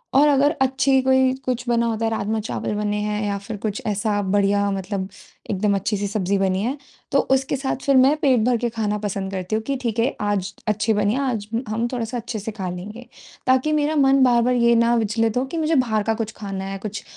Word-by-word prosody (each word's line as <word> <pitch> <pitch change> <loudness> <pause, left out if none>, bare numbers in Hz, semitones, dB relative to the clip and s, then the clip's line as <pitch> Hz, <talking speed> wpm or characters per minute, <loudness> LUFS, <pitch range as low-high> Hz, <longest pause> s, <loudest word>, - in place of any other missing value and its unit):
और 290 +2 +6
अगर 285 +1 +4
अच्छी 265 0 +3
कोई 260 0 +3
कुछ 250 -1 -1
बना 235 0 +2
होता 225 0 -1
है 225 - 0
राजमा-चावल 215 0 -2
बने 210 0 -1
हैं 210 0 -2
या 200 -1 -1
फिर 205 +1 -7
कुछ 215 -1 -2
ऐसा 205 0 0
बढ़िया 200 +1 +2
मतलब 195 0 -3 0.4
एकदम 200 +1 +1
अच्छी-सी 200 +1 -1
सब्जी 200 -1 0
बनी 190 0 +1
है 265 +5 -2 0.3
तो 275 - +4 0.2
उसके 265 +1 -1
साथ 265 -1 -2
फिर 275 -1 +3
मैं 270 +4 +5
पेट 260 -5 +4
भर 245 -1 +3
के 240 +1 -1
खाना 210 -1 0
पसंद 195 -2 -3
करती 185 +2 -3
हूँ 220 - -1
कि 275 - 0
ठीक 230 -2 -2
है 235 - +1
आज 205 -1 -1 0.2
अच्छी 215 +1 +1
बनी 210 +1 +1
है 280 - 0
आज 210 -4 -3 0.2
हम 230 +2 -1
थोड़ा-सा 240 0 -3
अच्छे 230 -1 -5
से 220 +2 -5
खा 190 -4 -5
लेंगे। 210 +7 -8 0.4
ताकि 260 +4 +3
मेरा 305 +1 +1
मन 270 -1 +4
बार-बार 245 0 +3
ये 235 -1 +4
ना 235 +1 +3
विचलित 225 +1 0
हो 260 - +1
कि 330 +5 -6
मुझे 320 0 +1
बाहर 220 -5 +1
का 225 +1 +1
कुछ 220 -1 -3
खाना 195 -2 -5
है, 195 0 -4
कुछ 205 0 -6
220 Hz, 225 wpm, -22 LUFS, 205-255 Hz, 0.4 s, और